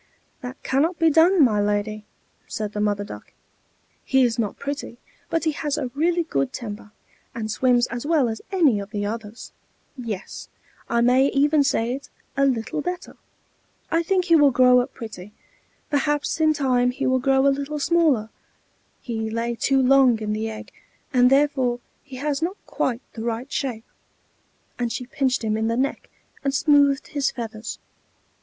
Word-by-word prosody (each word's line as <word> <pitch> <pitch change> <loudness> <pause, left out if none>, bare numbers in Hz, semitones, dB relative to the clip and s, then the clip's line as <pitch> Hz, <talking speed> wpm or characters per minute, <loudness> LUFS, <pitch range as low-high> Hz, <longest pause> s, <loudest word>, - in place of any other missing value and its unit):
"That 250 +1 -7
cannot 315 +6 +1
be 325 -1 +4
done, 330 +2 +5
my 215 -5 +3
lady," 210 +1 -1 0.4
said 215 -1 -4
the 210 - -3
Mother 205 -1 0
Duck. - - -10 0.7
"He 265 -1 +3
is 235 -1 +1
not 215 -3 -2
pretty, 280 -4 -5 0.3
but 330 - 0
he 315 - +2
has 295 0 -2
a 250 - -3
really 340 +4 +1
good 135 - -1
temper, 210 -3 -7 0.5
and 220 -2 -3
swims 245 +1 +3
as 240 0 -5
well 300 -4 +2
as 220 -1 -4
any 310 - +3
of 200 0 -7
the 205 -2 -3
others; 220 +1 -6 0.4
yes, 225 -7 -6 0.4
I 235 0 +2
may 255 +3 +4
even 290 +2 +3
say 240 -3 0
it, 275 +2 -7 0.3
a 275 0 +3
little 245 +2 -1
better. 360 +2 -5 0.8
I 330 - +3
think 365 +1 +1
he 335 -2 +5
will 290 -3 +6
grow 250 -1 +5
up 245 - -2
pretty, 210 -3 -9 0.6
perhaps 295 +2 0
in 310 0 +4
time 250 -3 +2
he 250 - -3
will 260 0 +2
grow 270 +1 +2
a 280 - +5
little 285 +2 -4
smaller; 295 -8 +2 0.7
he 220 -2 -3
lay 230 +1 -2
too 270 +3 +1
long 260 -2 +5
in 210 -1 -2
the 220 +1 -2
egg, 220 - -9 0.4
and 250 -1 +5
therefore 270 -3 +2 0.2
he 270 -2 -12
has 280 +2 -2
not 360 +5 -2
quite 250 -1 -2
the 225 - -7
right 235 +3 -3
shape." 240 -5 -3 0.9
And 240 -1 -1
she 250 - -4
pinched 260 0 -1
him 215 -1 0
in 220 +1 0
the 230 +1 0
neck, 270 +2 -2 0.3
and 275 0 0
smoothed 285 -1 +3
his 285 -3 0
feathers. 225 -2 -6
255 Hz, 175 wpm, -23 LUFS, 225-285 Hz, 0.9 s, will